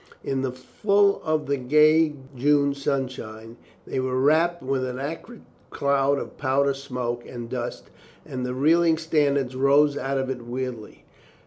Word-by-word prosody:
In 135 -1 -1
the 130 -1 -1
full 200 +10 +1
of 155 -1 0
the 140 0 0
gay 150 +4 +4 0.2
June 140 +2 +2
sunshine 125 -5 -4 0.3
they - - -3
were 130 0 -1
wrapped 160 +4 +2
with 130 0 -1
an 125 -1 -4
acrid 165 - -7 0.3
cloud 140 0 +1
of - - -7
powder 140 0 +2
smoke 125 -3 -4
and 120 -2 -7
dust 120 0 -5 0.3
and 130 -1 -5
the 125 0 -3
reeling 165 +4 +3
standards 140 -5 0
rose 140 +2 +4
out 135 +1 -2
of 135 0 -1
it 125 -2 -5
weirdly. 120 -2 -6
135 Hz, 150 wpm, -24 LUFS, 130-150 Hz, 0.3 s, gay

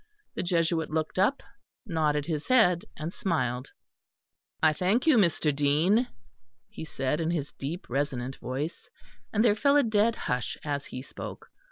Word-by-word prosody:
The - - -3
Jesuit 170 -2 +1
looked 155 +3 -2
up, 255 +9 +2 0.4
nodded 155 -6 0
his 155 -3 -3
head, 210 -7 +4
and 155 +3 -4
smiled. 140 - -1 0.9
"I 155 -1 +6
thank 190 - +1
you, 315 -4 +6
Mr. 165 -8 +3
Dean," 160 - +3 0.6
he - - -8
said, 150 0 -1
in 165 - 0
his 155 -4 -2
deep 155 +6 -5
resonant 135 -1 -2
voice, 140 +6 -5 0.4
and 215 +2 +2
there 215 - +6
fell 280 +7 +3
a 290 - +5
dead 220 0 +2
hush 125 -4 -2
as 145 -1 -3
he 125 - -7
spoke. - - -9
160 Hz, 155 wpm, -28 LUFS, 145-205 Hz, 0.9 s, I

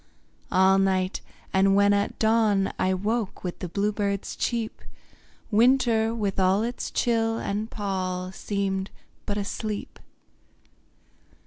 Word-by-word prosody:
All 190 +1 +5
night 190 -1 +1 0.3
and 195 +1 +4
when 200 0 +5
at 200 0 0
dawn 220 -3 +2
I 185 - +2
woke 215 +2 -2
with 180 -2 -4
the 180 - -5
blue 205 +4 0
bird's 200 -2 -2
cheep, 230 -2 -2 0.7
Winter 230 -1 +4
with 205 -4 -2
all 190 +3 +3
its 240 +1 -3
chill 225 -1 +1
and 210 +2 -3
pall 185 -3 -3
Seemed 195 -1 -2 0.4
but 205 - -1
a 200 - -2
sleep. 210 0 -5
200 Hz, 125 wpm, -26 LUFS, 190-220 Hz, 0.7 s, All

